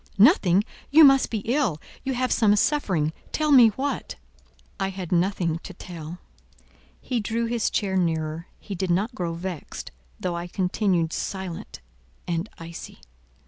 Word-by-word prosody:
Nothing! 200 - +5 0.3
You 315 +2 +8
must 270 -2 +6
be 220 -3 -2
ill; 240 - +1 0.2
you 265 -1 -2
have 255 +1 0
some 210 -2 +4
suffering; 190 - +1 0.2
tell 305 -1 +1
me 250 -5 +9
what." 265 +7 -3 0.6
I 195 - +1
had 185 -3 -6
nothing 175 -2 +1
to 190 - -10
tell. 170 -2 -8 0.8
He 250 -2 -2
drew 225 +2 -1
his 230 -1 0
chair 195 -2 -1
nearer. 165 -2 -1
He 205 - -7
did 190 0 -2
not 200 +8 +1
grow 170 -4 -3
vexed, 175 -2 -6 0.3
though 175 -1 -2
I 170 +1 -4
continued 180 -2 0
silent 190 - -5 0.5
and 170 +4 -2
icy. 165 - -9
190 Hz, 145 wpm, -25 LUFS, 170-230 Hz, 0.8 s, me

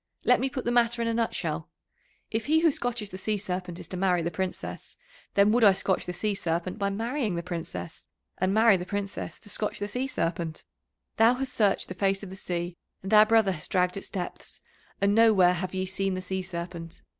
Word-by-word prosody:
Let - - +5
me 270 - 0
put 260 -1 -5
the 240 - +1
matter 240 0 +3
in - - -1
a 230 - +1
nutshell. 230 0 -2 0.6
If 225 +2 -2
he 320 +2 +4
who 330 -2 +5
scotches 240 -6 -3
the 185 - -7
Sea 210 +2 0
Serpent 180 -3 -4
is - - -8
to 185 - -4
marry 180 -2 +2
the 170 - -1
Princess, 185 +2 -5 0.4
then 200 +1 +5
would 240 +1 +3
I 200 -2 +8
scotch 190 -1 -1
the - - -1
Sea 205 +4 -1
Serpent 175 -1 -2
by 200 -1 +1
marrying 225 0 -1
the 170 - -3
Princess, 160 - -6 0.3
and 185 +1 +2
marry 220 -1 +5
the 180 - -4
Princess 200 0 -4
to 225 - -15
scotch 210 +1 -3
the 205 - -3
Sea 250 +5 -2
Serpent. 165 -8 -2 0.5
Thou 230 +2 +6
hast 260 0 -3
searched 205 -3 +2
the - - -5
face 195 +1 0
of 190 - -7
the - - -7
sea, 175 -2 -3 0.3
and 195 +3 -3
our 215 0 +8
brother 220 -3 +4
has 155 -4 -6
dragged 180 -1 +1
its 195 - -7
depths, 180 -2 -6 0.4
and 200 +1 +3
nowhere 210 -5 +6
have 185 +1 -4
ye 185 0 -1
seen 190 0 -1
the 185 - -3
Sea 190 +1 -3
Serpent. 170 -2 -7
195 Hz, 220 wpm, -27 LUFS, 180-225 Hz, 0.6 s, I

